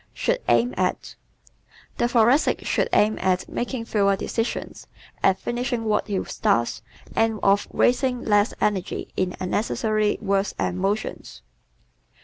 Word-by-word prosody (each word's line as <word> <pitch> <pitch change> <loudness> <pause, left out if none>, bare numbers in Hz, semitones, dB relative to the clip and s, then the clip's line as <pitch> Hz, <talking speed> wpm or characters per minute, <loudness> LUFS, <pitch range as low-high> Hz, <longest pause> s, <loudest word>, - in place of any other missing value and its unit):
Should - - 0
Aim 245 +1 +3
At - - +1
¶ - - -12 0.8
The 240 - +3
Thoracic 240 +4 +3
should - - +1
aim 215 +1 +3
at 185 -1 +1
making 240 -1 -4
fewer 200 -3 +2
decisions, 225 +4 -4 0.3
at 190 -1 +3
finishing 240 +1 -2
what 215 -1 0
he 200 -3 -1
starts, 115 -2 0 0.3
and 225 -1 +1
of 200 +1 +3
wasting 250 0 +1
less 205 +1 +3
energy 195 -4 -2
in 185 -1 -1
unnecessary 215 +2 0
words 200 -1 0
and 180 - -2
motions. 200 +3 -3
215 Hz, 130 wpm, -24 LUFS, 195-240 Hz, 0.8 s, Aim